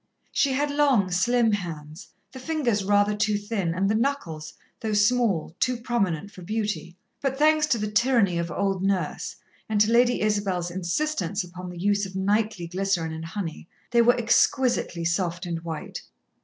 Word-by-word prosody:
She 275 -2 +2
had 285 +2 0
long, 275 -10 +3
slim 235 +5 +3
hands, 165 -3 -5 0.2
the 260 - -9
fingers 255 -8 0
rather 205 +1 +3
too 210 0 +1
thin 205 -4 -2
and 190 +2 +1
the 210 - +2
knuckles, 215 - -2 0.3
though 220 -1 -2
small, 205 -6 +2
too 250 -1 +1
prominent 200 -7 -1
for 185 - -12
beauty. 210 -3 -3 0.2
But, 270 -1 -1
thanks 305 +1 +4
to 250 - +2
the 210 -1 -3
tyranny 210 -5 +3
of 170 0 -2
old 195 +2 -1
Nurse, 190 -5 -1 0.3
and 215 -1 +1
to 215 +2 +4
Lady 245 +1 +4
Isabel's 195 -5 0
insistence 190 - -1
upon 180 +1 -8
the 180 - -9
use 200 +2 +1
of 185 - -12
nightly 205 -1 0
glycerine 180 -2 -1
and 160 +1 -6
honey, 165 -1 -6 0.2
they 235 -1 +5
were 245 +2 +4
exquisitely 240 -6 +2
soft 175 +1 -1
and 170 -1 -3
white. 165 -2 -6
205 Hz, 170 wpm, -25 LUFS, 175-235 Hz, 0.3 s, they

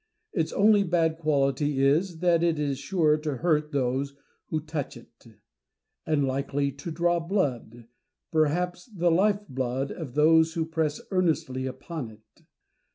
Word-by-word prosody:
Its 165 -4 0
only 210 0 +5
bad 165 -3 +1
quality 140 -2 +1
is, 160 +4 +1
that 175 -2 +3
it 170 -2 +2
is 140 -3 -1
sure 155 0 +2
to 150 -3 -3
hurt 150 -1 +1
those 140 +1 -1 0.3
who 155 - -1
touch 155 -4 -5
it; 115 0 -18 0.8
and 150 -3 +2
likely 140 +1 -1
to 140 +5 -8
draw 175 +1 +1
blood, 130 - -2 0.4
perhaps 175 - 0
the 175 -6 0
life 205 +4 +2
blood, 130 +1 -2
of 140 -7 -7
those 160 +2 +5
who 165 -1 0
press 160 -2 -2
earnestly 155 -8 0
upon 130 0 -6
it. 110 0 -20
155 Hz, 145 wpm, -27 LUFS, 140-170 Hz, 0.8 s, only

